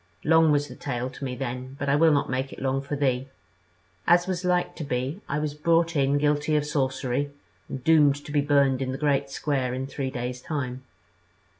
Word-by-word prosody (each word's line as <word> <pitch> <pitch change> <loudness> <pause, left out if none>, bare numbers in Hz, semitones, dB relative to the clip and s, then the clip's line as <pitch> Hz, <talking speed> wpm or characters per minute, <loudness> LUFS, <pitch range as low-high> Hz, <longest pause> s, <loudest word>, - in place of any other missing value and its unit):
Long 160 0 +5
was 145 0 +2
the - - -9
tale 125 -2 -3
to - - -10
me 130 -2 -3
then, 130 +1 -5
but 140 -1 -3
I 140 - +3
will 160 +2 +5
not 145 -1 +2
make 130 +1 -2
it - - -9
long 135 0 0
for 140 +1 -4
thee; 135 -2 0 0.8
as 175 +1 +5
was 185 -1 -3
like 180 -1 +1
to 160 - -4
be, 135 +6 -3
I 140 - 0
was 150 -1 -2
brought 165 +2 +2
in 140 0 +2
guilty 150 +1 +1
of 150 -1 +1
sorcery, 135 -1 -1 0.4
and 130 - -6
doomed 150 -2 +5
to - - -7
be 145 -1 +2
burned 140 -2 +3
in 130 -1 -1
the - - -3
Great 140 -1 +1
Square 135 -3 -1
in 130 +1 -3
three 135 -1 -4
days 125 -1 -4
time. 130 -4 -4
140 Hz, 210 wpm, -26 LUFS, 130-150 Hz, 0.8 s, Long